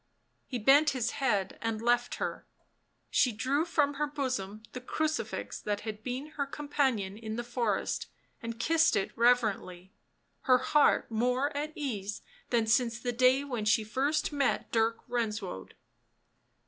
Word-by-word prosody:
He 250 - -3
bent 275 +7 +5
his 230 -2 0
head 205 -8 -1
and 225 -1 -2
left 240 +1 +1
her; - - -4 0.6
she 250 - +3
drew 265 +8 0
from 290 -4 +1
her 300 - +2
bosom 250 -8 -3
the 250 - -7
crucifix 315 +5 -2
that 205 -1 -2
had 215 -1 -6
been 260 +6 -5
her 280 -1 -1
companion 265 -9 -1
in 220 -1 -5
the 240 - -3
forest 235 -4 -1 0.3
and 230 0 -6
kissed 320 +5 +3
it 195 - -1
reverently, 215 -6 +1 0.5
her 255 -3 +6
heart 270 0 +3
more 250 +6 0
at 300 +2 -2
ease 210 -8 -4 0.3
than 235 -2 +2
since 235 +1 +2
the 245 0 -2
day 255 +3 +4
when 245 -7 -3
first 265 +8 +1
she 295 - -8
met 275 -3 0
Dirk 225 0 +1
Renswoude. 215 - -3
240 Hz, 150 wpm, -30 LUFS, 220-275 Hz, 0.6 s, her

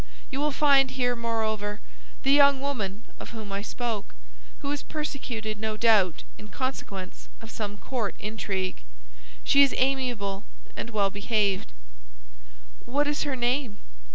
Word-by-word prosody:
You 270 - -2
will 300 +1 +2
find 280 -2 +5
here, 245 -2 +1
moreover, 220 -3 -1 0.4
the 270 - +4
young 280 -1 +7
woman 220 -7 -3 0.2
of - - -7
whom 210 -2 -7
I 200 0 -2
spoke, 225 - -3 0.5
who 280 - -1
is 290 - -1
persecuted, 240 -8 -4
no 215 0 -2
doubt, 210 -7 +4 0.2
in 210 - -9
consequence 205 -7 -5
of 225 0 -10
some 205 -2 -4
court 230 -2 -3
intrigue. 195 -3 -3 0.6
She 280 - +6
is 275 - +5
amiable 245 -7 0 0.3
and - - -4
well 205 -3 +1
behaved." 205 - 0 1.2
"What 285 +4 +2
is 295 0 0
her 265 - 0
name?" 245 -2 0
225 Hz, 140 wpm, -27 LUFS, 205-270 Hz, 1.2 s, young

